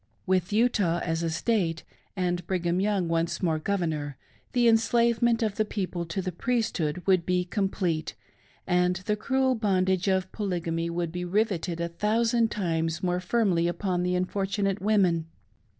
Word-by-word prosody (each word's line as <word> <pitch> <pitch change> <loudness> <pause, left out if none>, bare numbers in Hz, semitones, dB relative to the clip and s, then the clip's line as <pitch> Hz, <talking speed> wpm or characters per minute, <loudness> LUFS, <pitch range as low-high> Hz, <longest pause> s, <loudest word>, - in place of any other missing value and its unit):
With 185 0 +1
Utah 205 -6 +2
as 165 -1 -1
a 165 - 0
State, 170 -1 0 0.3
and 180 -2 -1
Brigham 175 -1 0
Young 195 -3 +1
once 165 +3 -1
more 160 -3 +1
Governor, 155 -6 -2 0.3
the 245 -1 +3
enslavement 235 +1 +3
of 210 -2 -1
the 215 - +3
people 185 -5 -4
to 185 +4 -3
the 185 - -2
Priesthood 180 - -1
would 185 -3 +3
be 180 +1 0
complete, 180 -5 -1 0.5
and 180 0 +2
the 210 - +1
cruel 260 +4 +1
bondage 190 -4 +1
of 190 -1 +1
Polygamy 170 -5 -2
would 170 -1 -2
be 180 +1 -4
rivetted 180 -3 -1
a 170 - -1
thousand 225 +6 +1
times 165 -4 -1
more 180 0 +1
firmly 185 -3 +1
ypon 180 +1 -1
the 180 0 0
unfortunato 195 +1 -1
women. 185 -6 +2
185 Hz, 150 wpm, -27 LUFS, 170-210 Hz, 0.5 s, the